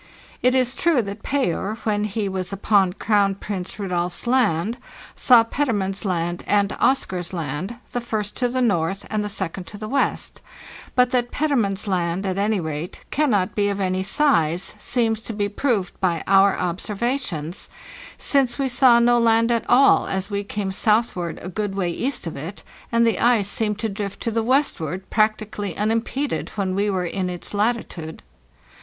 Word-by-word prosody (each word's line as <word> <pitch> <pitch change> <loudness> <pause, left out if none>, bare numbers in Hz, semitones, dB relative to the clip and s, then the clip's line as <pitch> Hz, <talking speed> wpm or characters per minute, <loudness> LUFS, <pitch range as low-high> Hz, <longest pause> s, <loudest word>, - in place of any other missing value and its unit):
It 250 +1 +3
is 255 -1 +2
true 315 -5 +2
that 200 +1 -7
Payer, 215 -6 -1
when 210 -1 0
he 210 0 -2
was 190 -1 -3
upon 195 -2 +2
Crown 200 -1 +1
Prince 190 -2 -5
Rudolf's 180 -2 -2
Land, 235 -3 +1 0.4
saw 245 -3 +6
Petermann's 210 -6 -1
Land 175 -2 -2
and 205 -1 +2
Oscar's 185 -9 +1
Land, 165 - -4 0.2
the 245 - -2
first 215 -3 -3
to 250 - +1
the 255 +1 0
north 195 -3 0
and 215 -1 0
the 210 - -3
second 190 -2 -3
to 205 - -9
the 215 +1 -6
west; 275 +5 -1 0.5
but 250 -1 +4
that 245 -1 +1
Petermann's 235 -11 0
Land, 180 0 -1
at 190 0 -1
any 210 0 +1
rate, 160 +1 -5
cannot 220 -11 +1
be 205 -1 +1
of 200 0 -2
any 185 -1 0
size 190 - +2
seems 225 -3 +1
to 225 - -5
be 205 -1 -1
proved 205 -3 -1
by 170 -4 0
our 195 0 +4
observations, 195 - -3 0.5
since 270 -4 +2
we 275 -2 0
saw 245 -1 +6
no 240 0 +4
land 230 0 +3
at 230 -1 -1
all 270 +3 +5
as 195 +2 -3
we 200 0 -1
came 200 -1 -3
southward 210 -4 0
a - - -5
good 200 +1 -3
way 180 -3 -1
east 260 +7 -2
of 165 - -5
it, 165 +8 -7 0.3
and 235 0 +3
the 230 - +1
ice 235 -5 +3
seemed 210 0 +1
to 225 +1 -1
drift 200 -1 -5
to 230 - -1
the 225 +1 0
westward 195 - 0
practically 215 -3 0
unimpeded 230 +6 -1
when 195 -3 -1
we 200 +2 0
were 185 -2 -1
in 185 +1 -2
its 175 +2 -5
latitude. 205 -7 -2
205 Hz, 175 wpm, -22 LUFS, 185-235 Hz, 0.5 s, saw